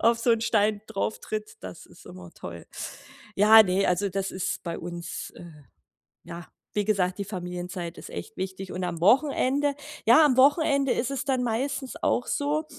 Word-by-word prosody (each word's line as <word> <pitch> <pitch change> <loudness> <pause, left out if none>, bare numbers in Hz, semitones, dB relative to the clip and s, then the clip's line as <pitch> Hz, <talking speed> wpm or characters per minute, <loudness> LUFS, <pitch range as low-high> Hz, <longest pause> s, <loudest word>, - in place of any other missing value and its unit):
auf 230 0 +3
so 235 +1 +1
'n 230 -1 +3
Stein 215 -2 +1
drauf 205 +2 -3
tritt, 215 0 -5
das 90 -1 -9
ist - - -18
immer 90 -1 -11
toll. - - -9 0.7
Ja, 220 +2 +8
ne, 190 0 +1
also, 180 +3 +1
das 195 0 -3
ist 185 0 -3
bei 170 -1 -4
uns 170 0 -6
äh, - - -10 0.8
ja, 170 -1 -9 0.3
wie 205 -1 +1
gesagt, 190 -3 0
die 200 - -2
Familienzeit 180 -2 -6
ist - - -10
echt - - -8
wichtig. 190 0 -5
Und 180 0 -3
am 170 -2 -4
Wochenende 275 - +3 0.3
ja, 250 +8 +7
am 275 -4 +3
Wochenende 280 0 +4
ist 245 - -1
es 275 -2 -3
dann 260 -3 0
meistens 255 +3 -2
auch 245 - +1
so, 295 +2 0
210 Hz, 180 wpm, -26 LUFS, 180-255 Hz, 0.8 s, Ja